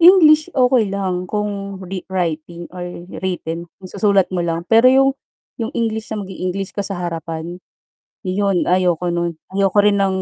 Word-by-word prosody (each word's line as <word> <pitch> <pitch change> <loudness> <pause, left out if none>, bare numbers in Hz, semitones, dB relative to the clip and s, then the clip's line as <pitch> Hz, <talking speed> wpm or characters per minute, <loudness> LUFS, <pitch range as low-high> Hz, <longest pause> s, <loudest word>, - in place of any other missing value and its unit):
English, 330 -2 +7
okey 250 -4 +3
lang. 185 -2 -1
Kung 200 -2 -3
re 185 0 -6
writing 170 -1 -2
or 180 - -5 0.4
written, 170 -2 -3
'yong 185 - -9
susulat 200 -3 +3
mo 180 - 0
lang. 165 0 -2
Pero 225 +2 +6
'yong 270 +1 +5 0.5
'yong 225 - -2
English 220 -1 -1
na 215 - -2
mag-e-English 190 0 -4
ka 200 - -1
sa 195 -1 -3
harapan, 165 +1 -5 0.7
'yon 190 0 +1
ayoko 180 -1 +2
no'n. 170 -1 -1 0.2
Ayoko 195 0 +2
rin 205 -1 +4
ng 190 -1 +1
190 Hz, 160 wpm, -19 LUFS, 175-210 Hz, 0.7 s, English